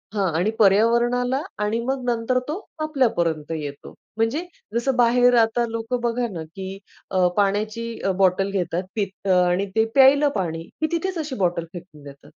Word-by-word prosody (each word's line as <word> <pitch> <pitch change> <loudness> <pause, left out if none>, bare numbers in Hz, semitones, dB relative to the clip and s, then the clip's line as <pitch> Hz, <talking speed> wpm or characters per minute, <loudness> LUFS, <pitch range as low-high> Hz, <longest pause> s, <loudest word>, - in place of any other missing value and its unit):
हां 190 -4 +1
आणि 195 +5 +1
पर्यावरणाला 235 +5 +3 0.2
आणि 215 +2 0
मग 265 0 -2
नंतर 235 +2 +1
तो 315 +7 -3 0.2
आपल्यापर्यंत 195 - 0
येतो. 145 -3 -6 0.2
म्हणजे 230 +10 0 0.3
जसं 245 +3 +1
बाहेर 245 0 +4
आता 230 +2 +1
लोकं 230 +2 -3
बघा 240 0 0
ना, 165 -2 -5
की 190 +4 -8 0.3
अ, 185 -1 +3
पाण्याची 210 +3 0 0.2
अ, 195 - +2
बॉटल 195 +1 +2
घेतात 180 -2 -1
पित 200 -2 -4
आणि 180 +1 +3
ते 220 0 +4
प्यायला 280 +2 +6
पाणी 165 -3 -3 0.2
की 315 - +2
तिथेच 355 +2 -2
अशी 300 -4 -4
बॉटल 175 -2 0
फेकून 175 -4 -11
देतात. 140 -1 -13
220 Hz, 160 wpm, -23 LUFS, 180-245 Hz, 0.3 s, प्यायला